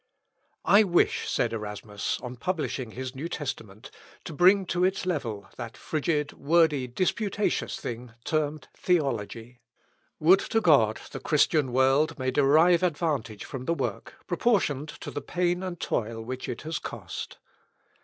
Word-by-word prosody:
"I 205 +2 +7
wish," 175 -4 +2
said - - 0
Erasmus 105 -1 -4
on 125 0 -6
publishing 130 -4 -2
his 130 +3 -6
New 145 +5 -5
Testament, 110 - -6 0.3
"to 165 - -7
bring 185 +5 +5
to 180 +1 0
its 190 0 +1
level 120 - -3
that 115 -2 -7
frigid, 150 -1 -1
wordy, 150 -3 +2
disputatious 200 - -1
thing, 120 0 -6
termed 155 -2 -1
Theology. 120 - -1 0.6
Would 175 +5 +6
to 225 - 0
God 135 - +4
the - - -6
Christian 150 -2 +2
world 135 +5 +3
may 130 -1 -1
derive 155 +6 +5
advantage 145 - -1
from 130 -2 -6
the 170 - +1
work, - - -4
proportioned 155 - +1
to - - -6
the 145 - -4
pain 175 0 0
and 180 -3 -5
toil 115 0 -2
which 130 +2 -5
it 120 - -5
has 160 0 -3
cost." - - -7
145 Hz, 145 wpm, -27 LUFS, 125-175 Hz, 0.6 s, I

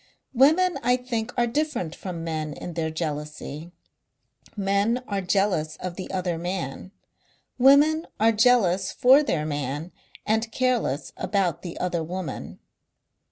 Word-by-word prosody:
Women 315 +6 +4
I 245 +1 +3
think 245 -2 -3
are 240 - +3
different 240 - -2
from 175 -3 -6
men 155 -2 -3
in 175 - -7
their 160 -1 -2
jealousy. 155 0 -5 0.9
Men 200 +5 +1
are 200 -1 -1
jealous 185 -4 0
of 180 -1 -6
the 185 - -7
other 180 -3 -2
man; 175 -1 -4 0.7
women 290 +5 +5
are 225 +1 +5
jealous 210 -5 +3
for 265 +4 +6
their 170 - -1
man 145 +2 -3 0.3
and 220 +1 0
careless 240 - 0
about 180 -5 0
the 175 -2 -7
other 175 -2 -1
woman. 180 +2 -6
190 Hz, 130 wpm, -25 LUFS, 165-245 Hz, 0.9 s, for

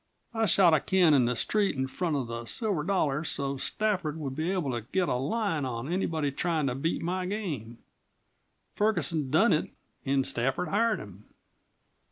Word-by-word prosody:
I 225 -1 +1
shot 180 -3 +5
a 155 - +5
can 180 0 +3
in 130 -4 +4
the 125 +1 0
street 205 - +1
in 130 0 -1
front 160 +4 -2
of 135 -3 -1
the 115 0 -6
Silver 200 - 0
Dollar 155 -5 0
so's 140 -3 -2
Stafford 185 -8 -1
would 140 -4 -4
be 160 +4 -1
able 180 -8 -1
to 120 -1 -2
get 185 -2 +1
a - - +1
line 160 - -1
on 130 +5 -3
anyone 160 -6 -1
tryin' 160 -1 0
to 130 - 0
beat 145 +6 -2
my 180 +2 -2
game. 150 - -4 1.0
Ferguson 170 -9 0
done 170 - +4
it 155 - 0 0.3
an' 135 0 +1
Stafford 135 +6 -1
hired 225 +2 +2
him." 100 0 -11
155 Hz, 180 wpm, -28 LUFS, 135-185 Hz, 1.0 s, shot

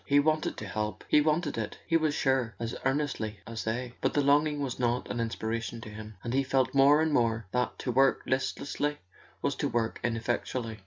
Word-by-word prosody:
He 145 0 +5
wanted 155 +1 +1
to 110 - -5
help, 105 +2 -3
he 150 - +5
wanted 155 -3 +1
it, 110 - -4
he 165 - +1
was 155 -3 +2
sure, 130 -5 +1
as 115 +2 -4
earnestly 135 -7 -1
as 115 -1 -5
they; 120 +2 -2
but - - 0
the 145 - +3
longing 145 +1 +3
was 135 -3 -3
not 120 0 0
an 120 - -3
inspiration 115 0 -2
to 110 - -8
him, 105 0 -9
and 120 - -3
he 135 - +3
felt 130 -2 +1
more 140 +3 +6
and 160 -1 +1
more 115 -3 +2
that 125 -2 0
to 125 - -2
work 135 +2 +3
listlessly 145 +2 -1 0.5
was - - +1
to - - 0
work 115 -2 -1
ineffectually. 115 -1 -2
125 Hz, 205 wpm, -29 LUFS, 115-145 Hz, 0.5 s, more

